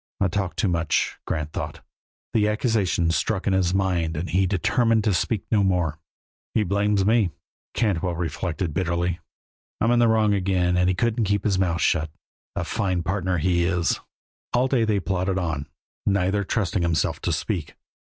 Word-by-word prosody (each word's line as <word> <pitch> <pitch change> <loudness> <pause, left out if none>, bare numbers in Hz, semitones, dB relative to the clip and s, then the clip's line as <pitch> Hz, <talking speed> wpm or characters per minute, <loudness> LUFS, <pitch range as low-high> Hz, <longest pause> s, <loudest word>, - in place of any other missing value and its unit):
I 100 - +2
talk 95 +1 -2
too 110 - +1
much," 85 -3 0
Grant 75 -1 -2
thought. - - -5 0.5
The 105 -2 +3
accusation 105 -6 +1
struck 95 +5 -1
in 100 - +2
his 95 -2 +2
mind 90 -4 0
and 85 +1 -3
he 95 +2 +3
determined 110 +4 +2
to 105 - +2
speak 100 +2 -1
no 105 -3 +4
more. 90 -5 0 0.6
"He 110 - +3
blames 100 0 +1
me," 110 -3 +3 0.5
Cantwell 95 -6 0
reflected, 85 0 -3
bitterly. 85 0 -1 0.6
"I'm 115 - +2
in 120 0 +4
wrong 110 -2 +4
again 90 -2 +1
and 90 0 +3
he 95 - +1
couldn't 115 +3 +1
keep 100 0 0
his 100 -3 +1
mouth 85 -3 +1
shut. 80 -1 +2 0.5
A - - -1
fine 90 -3 -1
partner, 95 -1 -1
he 85 +1 +2
is!" 90 -1 +1 0.5
All 125 +2 +3
day 130 -4 +2
they 105 -2 +1
plodded 95 +1 -1
on, 80 -5 -2 0.4
neither 100 0 +2
trusting 100 -2 -1
himself 85 -2 0
to - - -1
speak. 90 -9 -3
95 Hz, 170 wpm, -24 LUFS, 85-105 Hz, 0.6 s, no